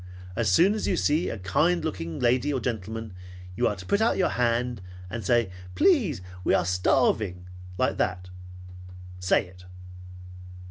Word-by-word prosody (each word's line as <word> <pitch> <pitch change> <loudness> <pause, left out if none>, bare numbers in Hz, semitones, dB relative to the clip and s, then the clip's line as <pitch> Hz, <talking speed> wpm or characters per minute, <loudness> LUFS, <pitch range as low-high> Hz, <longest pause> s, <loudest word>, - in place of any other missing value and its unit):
As 115 -2 +1
soon 175 - +5
as 215 - -2
you 185 - +1
see 155 +4 +1
a - - -4
kind 155 - +1
looking 85 - -4
lady 125 +4 +2
or 135 - 0
gentleman, 110 -2 -4 0.4
you - - +2
are 105 - -1
to 90 -1 -10
put 200 - +1
out 225 - +2
your 185 - +2
hand, 120 -2 0 0.3
and 115 0 -4
say, 115 -1 +2 0.2
'Please, 255 - +3 0.2
we - - +3
are - - +1
starving,' 90 +1 +1 0.3
like - - 0
that. 90 0 -2 0.9
Say 90 0 +2
it!" 90 0 -16
115 Hz, 155 wpm, -26 LUFS, 90-150 Hz, 0.9 s, soon